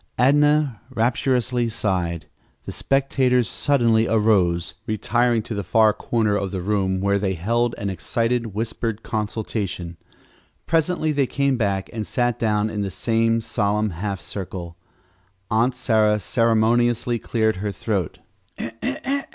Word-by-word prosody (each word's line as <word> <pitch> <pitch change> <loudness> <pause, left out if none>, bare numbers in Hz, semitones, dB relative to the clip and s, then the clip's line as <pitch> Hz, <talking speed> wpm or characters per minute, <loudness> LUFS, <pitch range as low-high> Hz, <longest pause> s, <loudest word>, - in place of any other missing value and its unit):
Adnah 145 -1 +3
rapturously 125 0 0
sighed. 90 -6 -2 0.4
The - - -5
spectators 130 -3 +1
suddenly 115 -6 +2
arose, 100 -6 +2
retiring 115 +2 +1
to 115 - -6
the 100 -1 -3
far 110 +3 +4
corner 110 -2 0
of 100 -1 -1
the 95 - -4
room, 95 -1 0
where 100 0 +2
they 95 -2 -1
held 115 +7 0
an 100 -1 -3
excited, 115 +6 -1
whispered 115 0 -3
consultation. 105 -5 -3 0.7
Presently 160 -1 +1
they 140 -3 +1
came 140 0 +1
back 100 -5 -1
and 110 -2 -4
sat 120 -2 0
down 105 -2 +1
in 105 -1 -3
the 100 - -2
same 115 +4 +1
solemn 105 -1 0
half 95 +2 -4
circle. 85 -1 -6 0.8
Aunt 120 +4 +2
Sarah 110 -4 +2
ceremoniously 115 +2 +2
cleared 110 -3 0
her 100 +2 -2
throat. 100 -5 -2
110 Hz, 125 wpm, -22 LUFS, 100-120 Hz, 0.8 s, far